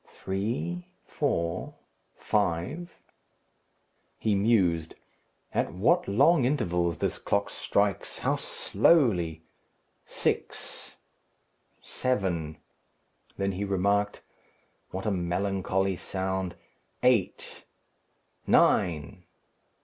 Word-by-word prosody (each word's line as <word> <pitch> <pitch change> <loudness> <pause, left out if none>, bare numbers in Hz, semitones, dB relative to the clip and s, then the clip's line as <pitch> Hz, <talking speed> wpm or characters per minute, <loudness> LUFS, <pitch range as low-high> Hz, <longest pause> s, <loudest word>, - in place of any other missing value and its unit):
"Three, 95 -3 -2 0.2
four, 85 0 -2 0.4
five." 105 - -1 1.2
He 110 - +1
mused. 95 -6 +2 0.6
"At - - 0
what 145 - +2
long 140 +9 +4
intervals 90 - +1
this - - -1
clock - - 0
strikes! - - 0
how - - 0
slowly! 90 - +2 0.6
Six; - - -3 0.9
seven!" 90 -11 -1 0.8
Then 100 0 0
he 95 +2 -3
remarked, 100 +1 0 0.7
"What 95 +1 -5
a 105 - +1
melancholy 95 +1 0
sound! 95 -1 -3 0.5
Eight, 125 -7 +1 0.8
nine! 75 -5 +2
95 Hz, 75 wpm, -28 LUFS, 85-105 Hz, 1.2 s, long